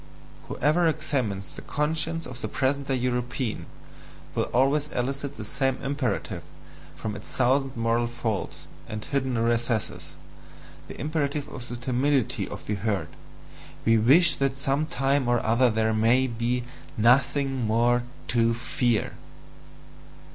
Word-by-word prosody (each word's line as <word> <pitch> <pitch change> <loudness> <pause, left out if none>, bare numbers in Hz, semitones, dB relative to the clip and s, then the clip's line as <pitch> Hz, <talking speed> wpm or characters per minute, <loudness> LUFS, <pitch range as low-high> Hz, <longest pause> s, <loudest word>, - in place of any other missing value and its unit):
Whoever 160 +5 +2
examines 130 -11 -1
the - - -7
conscience 160 +2 -1
of 125 +1 -8
the - - -2
present 140 +1 0
day 135 - +1
European, 125 -1 -2 0.7
will - - 0
always 140 +4 +2
elicit 140 +2 -3
the - - -6
same 135 -1 0
imperative 135 -6 -2 0.5
from 110 -2 -4
its 100 - -9
thousand 135 +1 +1
moral 115 +1 +1
folds 115 -4 -4 0.2
and 110 0 -5
hidden 130 -3 -1
recesses, 115 -1 -1 0.7
the - - -9
imperative 150 -1 -1
of 125 -2 -8
the 120 - -4
timidity 130 0 0
of - - -8
the 105 - -2
herd 100 -5 -1 0.8
"we 115 0 +5
wish 145 +8 +6
that 135 -1 0
some 140 +2 0
time 135 -2 +1
or 120 0 +3
other 120 +3 +4
there 110 0 +1
may 115 +4 +4
be 120 0 -1 0.3
NOTHING 135 +2 +3
MORE 120 +2 +3 0.3
TO 115 -1 +2
FEAR!" 115 -1 0
125 Hz, 135 wpm, -26 LUFS, 115-140 Hz, 0.8 s, wish